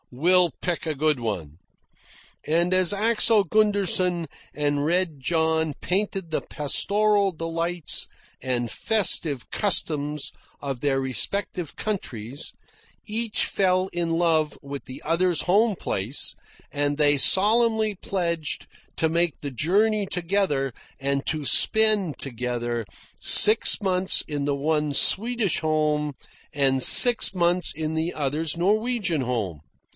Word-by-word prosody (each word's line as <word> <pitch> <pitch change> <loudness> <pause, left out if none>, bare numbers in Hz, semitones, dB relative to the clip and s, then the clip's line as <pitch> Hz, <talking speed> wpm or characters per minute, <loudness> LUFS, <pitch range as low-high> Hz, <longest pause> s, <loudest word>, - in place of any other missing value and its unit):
We'll 175 +6 +3
pick 175 -2 -2
a 155 -2 -2
good 150 -1 0
one." 85 -9 -5 0.9
And 170 +4 +1
as 185 -1 +3
Axel 215 0 +2
Gunderson 185 -4 +1 0.3
and 145 -1 -1
Red 170 -1 -1
John 160 +1 0
painted 190 -2 -2
the - - -1
pastoral 200 +7 0
delights 165 0 -2 0.3
and 120 -2 -2
festive 165 - 0
customs 150 -7 0 0.3
of 135 -3 -5
their 140 -2 0
respective 160 - -2
countries, 135 - -4 0.5
each 225 0 -1
fell 185 -1 0
in 170 -1 -2
love 160 -3 +1
with 140 0 -7
the 130 - -10
other's 170 +1 +1
home 210 +4 +2
place, 105 +9 -3 0.4
and 145 0 -1
they 145 -1 +3
solemnly 220 - +4
pledged 170 -5 -4 0.3
to 160 - +2
make 170 0 -1
the 140 - -6
journey 200 - +1
together, 170 -8 -1 0.3
and 140 0 -2
to 155 -2 -2
spend, 215 -2 +3
together, 120 -2 -4 0.4
six 215 +2 +5
months 185 -1 +2
in 145 -2 -3
the 145 -1 0
one's 150 0 -1
Swedish 225 -2 +1
home 150 -2 -1 0.4
and 135 -3 +1
six 245 -5 +5
months 175 -1 0
in 155 0 -4
the 160 +2 -2
other's 150 +2 -2
Norwegian 205 - 0
home. 110 - -3
165 Hz, 120 wpm, -24 LUFS, 145-195 Hz, 0.9 s, six